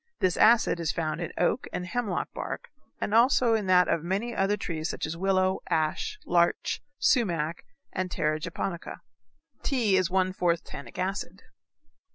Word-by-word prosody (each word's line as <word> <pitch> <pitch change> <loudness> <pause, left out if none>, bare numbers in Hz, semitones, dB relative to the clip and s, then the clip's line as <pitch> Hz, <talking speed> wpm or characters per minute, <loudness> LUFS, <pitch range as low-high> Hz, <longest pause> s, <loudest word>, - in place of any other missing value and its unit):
This 185 -2 +2
acid 220 -5 +5
is 165 -2 0
found 160 0 -2
in 170 - -3
oak 200 +8 +1
and 180 - -3
hemlock 210 -2 -2
bark, - - -6 0.3
and 210 - -2
also 240 0 +5
in 215 -3 0
that 180 -1 +5
of 165 - +1
many 200 +7 -2
other 195 +2 +1
trees 160 -4 -3
such - - -3
as 160 - -4
willow, 185 +1 +1
ash, 165 - 0
larch, 170 -1 +1 0.2
sumac, 170 - +1 0.3
and 185 -1 -2
terra 155 -3 0
japonica. 170 +2 -5 0.6
Tea 230 -8 +2
is 185 -1 +2
one 185 0 +1
fourth 170 -2 +1
tannic 140 -4 -10
acid. 190 +2 -3
185 Hz, 160 wpm, -28 LUFS, 170-205 Hz, 0.6 s, acid